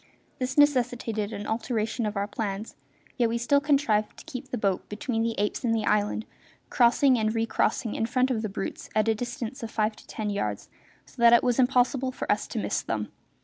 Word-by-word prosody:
This 255 +1 -2
necessitated 245 -7 +2
an 205 -1 -5
alteration 225 0 -1
of 210 -1 -4
our 200 - 0
plans, 205 0 -4 0.4
yet 240 -3 +3
we 230 - 0
still 280 +4 +2
contrived 275 -8 +1
to - - -12
keep 255 - -7
the 250 - -2
boat 195 -4 -1
between 225 +2 -2
the 230 0 0
apes 205 +5 -1
and 230 -2 +2
the 220 - -1
island, 210 +1 +1 0.5
crossing 250 +1 +4
and 215 +1 0
recrossing 225 0 0
in 225 - -1
front 255 +2 +1
of 225 -3 0
the 215 - -3
brutes 195 - -5
at 215 0 +3
a 225 - +4
distance 240 +3 -5
of 230 - -5
five 215 -1 0
to - - -16
ten 210 -1 -3
yards, 105 - -3 0.4
so - - -11
that 235 0 +8
it 235 - +6
was 245 0 +1
impossible 255 +1 +2
for - - -3
us - - 0
to - - -6
miss - - -1
them. - - -3
230 Hz, 210 wpm, -27 LUFS, 215-250 Hz, 0.5 s, that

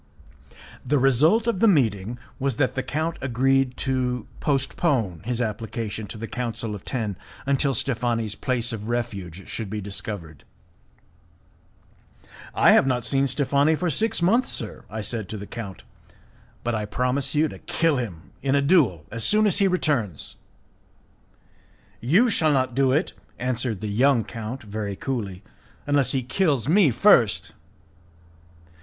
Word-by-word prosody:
The 145 +3 +1
result 145 - +4
of 235 -6 0
the 230 - +5
meeting 115 - +2 0.2
was 135 -2 0
that 130 0 +1
the 130 - -1
count 155 +6 -2
agreed 130 +1 +1
to 125 -3 -1
postpone 135 - 0
his 120 0 -2
application 110 -1 -3
to 110 - -6
the 115 - -5
Council 115 -3 -3
of 100 - -7
Ten 110 -7 -3 0.3
until 140 0 +1
Steffani's 120 -4 -1
place 120 0 -1
of 105 -1 -6
refuge 100 -7 -4
should 110 -4 -5
be 105 +1 -3
discovered. 100 -6 -6 2.1
"I - - +6
have 135 - +5
not 125 -3 0
seen 135 0 +2
Steffani 140 +3 +2
for 175 0 0
six 215 - 0
months, 230 +9 +3
sir," 110 - -7
I 110 +2 -4
said 110 -1 -4
to 110 - -4
the 100 - -7
count, 100 -5 -8 0.8
"but 120 - -1
I 110 -1 -1
promise 125 +6 -1
you 155 +2 +3
to - - -10
kill 165 -4 +1
him 95 -10 -6
in 135 0 +1
a 140 - +3
duel 135 - +3
as 115 0 -3
soon 215 +1 +4
as 200 -1 +3
he 200 - +4
returns." 140 - -1 1.6
"You 175 - +4
shall 155 -6 +2
not 130 -2 +1
do 135 +1 +3
it," 150 +7 +1 0.2
answered 120 -4 -2
the 110 - -3
young 120 +3 +3
count, 115 +4 -6
very 105 -1 -4
coolly, 105 -6 -4 0.4
"unless 140 -3 +2
he 130 -2 0
kills 135 - +1
me 175 0 +5
first." 120 - +4
125 Hz, 150 wpm, -24 LUFS, 110-140 Hz, 2.1 s, I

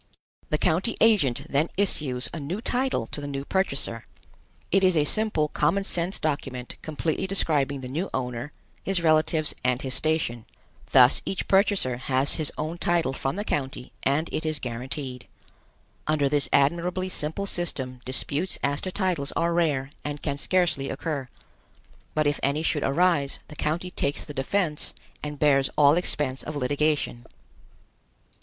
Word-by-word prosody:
The 155 - +1
county 180 +8 +1
agent 145 - +3
then 145 +3 +1
issues 145 -10 +2
a 165 - -4
new 160 +8 -4
title 255 +3 0
to 145 - -5
the 145 - -5
new 140 0 -4
purchaser. 140 -11 -1 0.6
It 195 +1 +4
is 185 -3 +4
a 150 - +4
simple 210 -7 +2
common 165 +8 +1
sense 180 0 -1
document 135 -5 -3
completely 160 +3 -2
describing 145 -7 +1
the 130 - -6
new 160 +9 -3
owner, 125 +1 -3 0.3
his 190 -3 0
relatives 155 -1 +3
and 125 0 +2
his 130 -1 -1
station. 155 -7 0 0.5
Thus 125 0 +6
each 195 - -3
purchaser 195 - +2
has 130 +2 +3
his 155 -2 +1
own 160 +3 -3
title 170 -6 +1
from 135 +2 -2
the 205 - -2
county 135 - -3
and 150 +4 +1
it 155 - -1
is 155 -1 -1
guaranteed. 125 +1 -5 0.8
Under 150 -2 +2
this 145 0 +3
admirably 175 +6 +2
simple 170 +2 -3
system 130 -9 -2
disputes 140 +7 -2
as 145 +1 0
to 185 - -3
titles 180 -8 0
are 170 0 +1
rare 145 -5 +1
and 145 0 -5
can 140 -2 -2
scarcely 175 -5 +1
occur; 145 -6 -3 0.9
but 155 0 +2
if 145 0 +1
any 140 +3 0
should 150 -2 0
arise, 145 -1 +2
the 150 - -10
county 165 +5 -2
takes 140 -4 -1
the 150 - -7
defense 150 +3 -1 0.3
and 150 -1 -5
bears 140 -2 +4
all 145 -1 +7
expense 150 -6 -1
of 155 - -6
litigation. 145 -2 0
150 Hz, 155 wpm, -26 LUFS, 135-175 Hz, 0.9 s, all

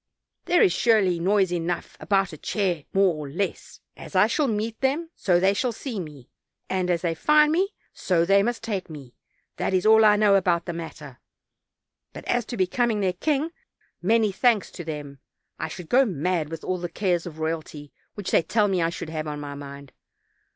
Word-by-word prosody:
There 350 - +4
ia - - +6
surely 190 -2 +2
noise 190 0 +2
enough 175 0 -3
about 195 -3 +1
a - - -8
chair 180 -8 -1
more 195 -2 +3
or 150 -2 -6
less! 185 +7 -4
As - - -11
I 185 +2 +6
shall 275 +6 +1
meet 220 0 -3
them, 300 +5 0
so 175 -3 +2
they 190 +2 +3
shall 245 +5 0
see 230 -1 -5
me; 150 -7 -9 0.4
and 185 -1 0
as 175 -1 0
they 170 -2 +1
find 300 - +4
me, 380 +5 0 0.2
so 170 -3 +1
they 195 +2 +5
must 235 +3 -2
take 200 -6 -3
me, 140 -6 -10 0.4
that 190 - 0
is 185 - +1
all 220 0 +7
I 210 -1 +6
know 210 -1 +4
about 175 -3 +2
the 175 - -4
matter; 155 -5 -8 0.9
but - - -9
as 240 -2 0
to 240 - -6
becoming 215 +4 +1
their 185 -2 +1
king, 300 - -1 0.5
many 215 +3 +3
thanks 225 +1 +2
to 175 - -8
them, 145 -3 -7 0.4
I - - -2
should 180 -3 -9
go 260 +8 +5
mad 175 - -1
with 165 0 -7
all 185 -1 -2
the 175 0 -4
cares 175 -1 -1
of 160 -2 -9
royalty 160 -2 -5 0.2
which 205 -3 -5
they - - +5
tell 210 +4 +1
me 190 -3 0
I 165 - +2
should 170 - -6
have 155 -1 -4
on 150 -1 -4
my 145 -1 -6
mind. 140 -1 -10
185 Hz, 200 wpm, -25 LUFS, 165-215 Hz, 0.9 s, all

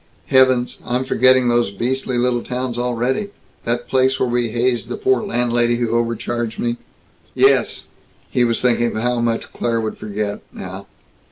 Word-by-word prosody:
Heavens, 130 -2 +3
I'm 125 +1 -1
forgetting 130 -1 +4
those 120 -2 +2
beastly 125 +5 -2
little 120 0 +1
towns 125 -1 -3
already 125 - -1 0.4
that 120 +1 -2
place 130 0 +2
where 130 - +2
we 120 -1 0
hazed 120 +1 0
the - - -3
poor 395 -1 +2
landlady 120 - +1
who 120 -1 -1
overcharged 115 0 -1
me." 120 0 -1 0.6
"Yes." - - +3 0.5
He 125 - +2
was 115 -1 +1
thinking 120 -2 +2
of 110 - -2
how 125 0 +1
much 115 -1 -1
Claire 115 -1 -1
would 110 -1 -4
forget, 105 -1 -4
now. 95 +1 -8
120 Hz, 160 wpm, -19 LUFS, 115-125 Hz, 0.6 s, forgetting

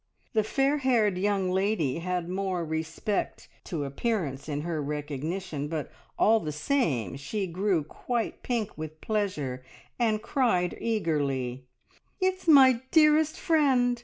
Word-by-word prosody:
The 215 -2 +3
fair 275 +6 +1
haired 225 -8 +2
young 195 -2 +1
lady 190 -7 0
had 180 0 -2
more 185 -2 -2
respect 160 +6 -3 0.2
to 160 -5 -3
appearance 145 - -2
in 145 0 -2
her 160 -1 -2
recognition, 150 +2 -4
but 155 -2 -4 0.3
all 225 +1 +5
the 155 -7 -4
same 150 - 0
she 195 +8 -3
grew 185 -1 0
quite 235 +9 -3
pink 230 -4 -2
with 155 0 -7
pleasure, 155 - -2 0.4
and 220 -3 +2
cried 225 -7 +1
eagerly 140 - -1 0.5
"It's 375 -1 0
my 260 -6 +7
dearest 310 0 +4
friend! 260 -7 +3
185 Hz, 130 wpm, -28 LUFS, 150-230 Hz, 0.5 s, my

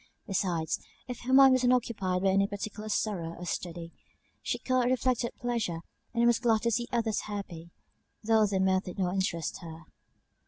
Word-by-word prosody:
Besides, 175 -5 -1 0.3
if 250 -2 -6
her 260 - -2
mind 270 0 +8
was 255 -1 +3
not 250 0 +5
occupied 195 -7 -1
by 195 - +4
any 195 +1 +3
particular 210 +1 -6
sorrow, 180 -6 -1
or 180 - -7
study, 170 -1 -4 0.5
she - - -2
caught 255 -1 +1
reflected 255 -1 0
pleasure, 230 -9 -2 0.3
and 235 0 +2
was 240 -2 +4
glad 230 -3 +2
to 235 - +2
see 240 +1 0
others 225 -3 0
happy, 180 -5 -6 0.5
though 220 -1 +4
their 195 -1 0
mirth 190 0 +2
did 180 - -7
not 180 -2 0
interest 185 -4 -2
her. 165 -1 -10
205 Hz, 180 wpm, -29 LUFS, 180-235 Hz, 0.5 s, mind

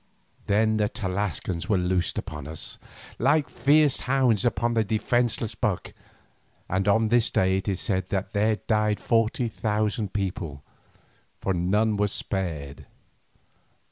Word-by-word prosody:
Then 110 +2 +3
the 105 -1 +1
Tlascalans 95 -4 -3
were 105 - +3
loosed 90 0 0
upon 75 -2 -5
us, 80 0 -6 0.4
like 140 +5 +3
fierce 145 +2 +3
hounds 125 -5 +2
upon 120 0 +1
a 110 - +3
defenceless 115 +1 0
buck, 105 -3 -2 0.7
and 95 +2 -1
on 110 +2 +3
this 120 +1 +3
day 95 0 +2
it 95 - -5
is 95 -2 -1
said 95 -4 -1
that 95 -1 -2
there 105 +1 +2
died 105 +1 0
forty 115 +1 +1
thousand 105 -2 -1
people, 90 -8 -4 0.8
for 95 - -1
none 105 +5 +1
were 105 0 +2
spared. 80 -9 -4
105 Hz, 135 wpm, -26 LUFS, 95-115 Hz, 0.8 s, Then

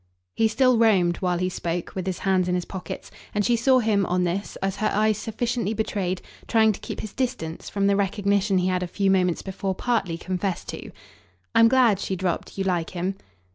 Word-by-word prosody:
He 225 - +3
still 250 +1 +3
roamed, 185 -7 +4
while 180 -2 0
he 185 +1 0
spoke, 175 -1 -3
with 190 -1 -4
his 185 -2 -1
hands 185 -2 +1
in 180 - +1
his 180 - -2
pockets, 185 -2 -7 0.2
and 205 -1 +1
she 240 - +3
saw 255 +3 +4
him, 215 -5 +2
on 180 0 +1
this, 180 +3 -2
as 195 0 -2
her 215 - +1
eyes 215 0 +2
sufficiently 225 -1 -2
betrayed, 190 -4 -2 0.2
trying 220 -2 +4
to 205 - -6
keep - - -6
his 215 - -7
distance 245 -11 -3
from 200 -1 0
the 200 0 +4
recognition 200 0 +1
he 180 0 +1
had 185 -1 0
a 180 - -2
few 195 +2 +1
moments 180 -3 +2
before 190 0 -3
partly 200 -7 -1
confessed 185 +1 -3
to. - - -6 0.6
"I'm 230 - +7
glad," 240 -5 +4
she 190 - -2
dropped, 185 0 -3
"you 195 - 0
like 175 -3 0
him!" 185 +2 -2
195 Hz, 210 wpm, -24 LUFS, 180-220 Hz, 0.6 s, I'm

